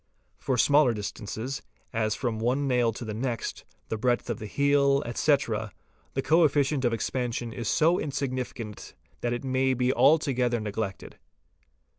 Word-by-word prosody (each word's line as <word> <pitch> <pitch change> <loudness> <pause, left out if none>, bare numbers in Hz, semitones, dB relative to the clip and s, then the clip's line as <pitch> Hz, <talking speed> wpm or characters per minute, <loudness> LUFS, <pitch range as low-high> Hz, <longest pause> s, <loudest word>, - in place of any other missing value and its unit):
For 130 - -1
smaller 140 -1 +4
distances, 110 +5 -5 0.3
as 110 -2 0
from 120 -4 -2
one 130 +5 0
nail 125 -3 +2
to 120 +2 -7
the 110 - -4
next, 115 0 -3 0.2
the 110 - -2
breadth 120 0 +1
of 115 - -4
the 110 - -6
heel, 140 +3 +3
etc., 120 -4 0 0.4
the 135 - 0
co 165 +2 +4
efficient 145 -2 +2
of 120 - +2
expansion 120 0 -2
is 115 -2 -4
so 165 - +3
insignificant 130 -6 -4 0.2
that 120 - -1
it 120 +2 -3
may 130 0 +1
be 125 +1 +1
alto 140 +3 +4
gether 120 -1 +1
neglected. 105 -2 -5
125 Hz, 155 wpm, -27 LUFS, 115-140 Hz, 0.4 s, smaller